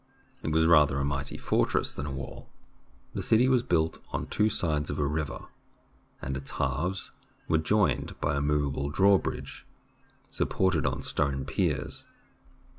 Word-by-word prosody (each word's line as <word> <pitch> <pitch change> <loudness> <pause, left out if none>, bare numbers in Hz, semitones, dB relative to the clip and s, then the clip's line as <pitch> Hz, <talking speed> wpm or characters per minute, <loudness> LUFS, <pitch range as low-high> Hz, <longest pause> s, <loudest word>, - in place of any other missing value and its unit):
It - - -2
was 80 +1 +3
rather 75 -4 +5
a 70 - 0
mighty 70 0 -3
fortress - - +1
than 70 - -5
a - - -4
wall. 70 0 -7 0.6
The - - -3
city 115 +3 +4
was 130 -2 +4
built 80 -7 0
on - - -2
two 105 +1 +1
sides 75 -7 0
of 70 - -3
a 75 - +1
river, 75 0 -3 0.8
and 70 0 -2
its 65 +1 -5
halves 80 +8 -2 0.4
were 80 - +3
joined 80 -6 +1
by 70 +1 0
a 70 - 0
movable 70 -1 0
draw 95 +5 +5
bridge 65 +2 -6 0.7
supported 90 -5 +1
on 70 +2 -2
stone 70 -1 0
piers. 75 -2 -1
75 Hz, 155 wpm, -28 LUFS, 70-85 Hz, 0.8 s, rather